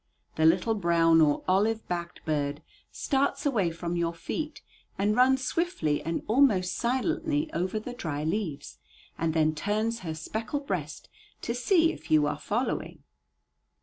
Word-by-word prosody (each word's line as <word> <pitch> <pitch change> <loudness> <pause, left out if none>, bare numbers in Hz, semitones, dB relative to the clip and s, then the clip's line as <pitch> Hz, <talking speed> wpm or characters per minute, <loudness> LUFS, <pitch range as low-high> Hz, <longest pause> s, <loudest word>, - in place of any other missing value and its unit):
The 160 0 +4
little 185 +7 +3
brown 170 -4 +4
or 145 -2 +3
olive 215 +4 +1
backed 170 -1 -5
bird 145 -1 -1 0.3
starts 280 +2 0
away 220 -11 +2
from 170 +1 -4
your 170 -1 -1
feet 305 - -5 0.3
and 205 +2 +1
runs 260 +2 +4
swiftly 250 - 0
and 165 +2 -3
almost 215 -7 +3
silently 305 +5 -1
over 185 +5 -1
the 245 +3 -7
dry 155 -11 -4
leaves, 160 -3 -3 0.4
and 165 -1 -1
then 155 -1 +3
turns 215 +7 -1
her 160 -3 -5
speckled 220 - -4
breast - - -4 0.4
to 235 - -1
see 325 +7 +3
if - - -13
you 155 -1 +5
are 150 0 -2
following. 220 - -3
195 Hz, 150 wpm, -28 LUFS, 165-250 Hz, 0.4 s, you